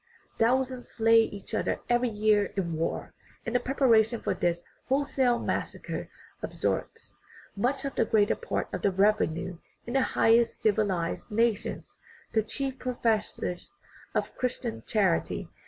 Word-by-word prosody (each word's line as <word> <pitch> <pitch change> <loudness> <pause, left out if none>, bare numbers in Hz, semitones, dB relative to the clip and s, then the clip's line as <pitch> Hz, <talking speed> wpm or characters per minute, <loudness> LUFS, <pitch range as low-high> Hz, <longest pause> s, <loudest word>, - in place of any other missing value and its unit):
Thousands 255 +2 +1
slay 225 0 +5
each 205 -1 -5
other 220 - 0
every 240 0 +2
year 210 -1 +3
in 170 -4 -1
war, 160 +1 -2 0.3
and 230 - -3
the 245 - +4
preparation 235 -3 +3
for 200 - -1
this 175 -1 -1 0.3
wholesale 265 -3 +2
massacre - - -3 0.3
absorbs - - -3 0.4
much 245 +7 0
the 275 -2 0
greater 210 -1 +3
part 475 - -3
of - - -3
the - - +3
revenue 185 -3 +1 0.3
in 240 - -5
the 270 - +3
highest 230 -1 +3
civilized 200 -6 0
nations, 225 0 -1 0.3
the 220 - +4
chief 265 +5 -4
professors 225 - -2 0.4
of - - -1
"Christian 250 -2 -2
charity." 195 -6 +1
225 Hz, 130 wpm, -28 LUFS, 205-245 Hz, 0.4 s, slay